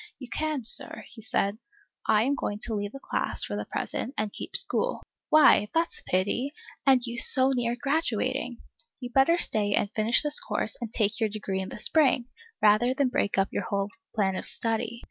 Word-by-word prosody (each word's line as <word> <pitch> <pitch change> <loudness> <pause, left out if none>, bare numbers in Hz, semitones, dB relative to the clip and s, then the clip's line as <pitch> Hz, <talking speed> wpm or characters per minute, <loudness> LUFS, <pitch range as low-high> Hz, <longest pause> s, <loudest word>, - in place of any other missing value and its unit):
You 255 - -9
can, 305 -4 -2
Sir, 230 - +3
he 225 - -12
said. 215 -3 -1 0.5
I 215 0 +4
am 270 +4 +1
going 205 -6 -3
to 230 - -1
leave 205 -1 -3
the 275 - -9
class, - - -2
for - - -4
the - - -4
present, 260 +4 -4
and 215 -1 -2
keep - - -7
school. - - -1 0.3
Why, 305 -8 +5
that 330 +1 +1
's - - -9
a - - -21
pity, 205 +10 0 0.3
and 260 -2 +4
you 235 0 -4
so 260 +2 +6
near 240 -2 -1
graduating! 260 -4 -2 0.4
You'd 245 -2 -8
better 275 +6 +4
stay 205 -10 +2
and 205 - -1
finish 225 +5 +3
this 295 0 +3
course - - -3
and 230 -2 -5
take 215 -1 0
your 220 -2 +1
degree 200 -2 -4
in 190 - -6
the - - -8
spring, 270 0 +2 0.4
rather 215 +5 +4
than 275 -1 +1
break 205 -6 -1
up 195 0 +2
your - - -2
whole 200 0 -2 0.2
plan 195 -3 +1
of - - -4
study. 230 +1 -3
235 Hz, 205 wpm, -27 LUFS, 210-270 Hz, 0.5 s, so